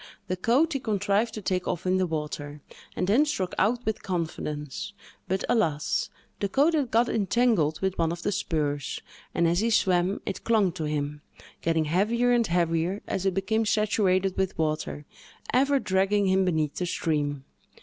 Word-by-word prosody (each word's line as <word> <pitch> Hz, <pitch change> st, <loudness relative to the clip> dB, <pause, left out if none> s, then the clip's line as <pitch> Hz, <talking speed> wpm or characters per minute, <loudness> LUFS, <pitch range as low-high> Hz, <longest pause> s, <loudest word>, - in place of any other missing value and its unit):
The 185 Hz, -, 0 dB
coat 255 Hz, -, +2 dB
he 275 Hz, -, -1 dB
contrived 210 Hz, 0 st, 0 dB
to 215 Hz, -, -6 dB
take 180 Hz, -1 st, -1 dB
off 175 Hz, -, -2 dB
in 185 Hz, 0 st, +2 dB
the 185 Hz, -1 st, +1 dB
water, 150 Hz, -2 st, -5 dB, 0.3 s
and -, -, 0 dB
then 220 Hz, +10 st, +4 dB
struck 195 Hz, -12 st, -2 dB
out 240 Hz, +5 st, +1 dB
with 220 Hz, -, -1 dB
confidence; 160 Hz, -2 st, -4 dB, 0.3 s
but, 190 Hz, +1 st, -1 dB
alas! 160 Hz, -11 st, +1 dB, 0.3 s
the 200 Hz, -, -1 dB
coat 290 Hz, -, +3 dB
had 290 Hz, -6 st, +1 dB
got 230 Hz, +2 st, +3 dB
entangled 210 Hz, -8 st, +1 dB
with 190 Hz, -1 st, -1 dB
one 165 Hz, -1 st, +2 dB
of 170 Hz, 0 st, -6 dB
the 205 Hz, -, 0 dB
spurs, 145 Hz, -6 st, -2 dB, 0.4 s
and, 170 Hz, -, +3 dB
as 170 Hz, +2 st, +2 dB
he 225 Hz, +2 st, +1 dB
swam, 185 Hz, -3 st, +2 dB
it 195 Hz, -, -4 dB
clung 215 Hz, -5 st, +3 dB
to 165 Hz, -2 st, -4 dB
him, 150 Hz, 0 st, -3 dB, 0.4 s
getting 165 Hz, -1 st, +1 dB
heavier 220 Hz, +10 st, +2 dB
and 235 Hz, -2 st, +3 dB
heavier 170 Hz, +2 st, 0 dB
as 195 Hz, 0 st, -2 dB
it 190 Hz, -, 0 dB
became 220 Hz, +3 st, +1 dB
saturated 200 Hz, -3 st, +1 dB
with 190 Hz, -1 st, -1 dB
water, 155 Hz, -1 st, -2 dB, 0.5 s
ever 275 Hz, +3 st, +4 dB
dragging 200 Hz, -2 st, +1 dB
him 190 Hz, 0 st, +3 dB
beneath 155 Hz, -5 st, 0 dB
the 180 Hz, -, -1 dB
stream. 145 Hz, -5 st, -1 dB
185 Hz, 175 wpm, -27 LUFS, 160-215 Hz, 0.5 s, then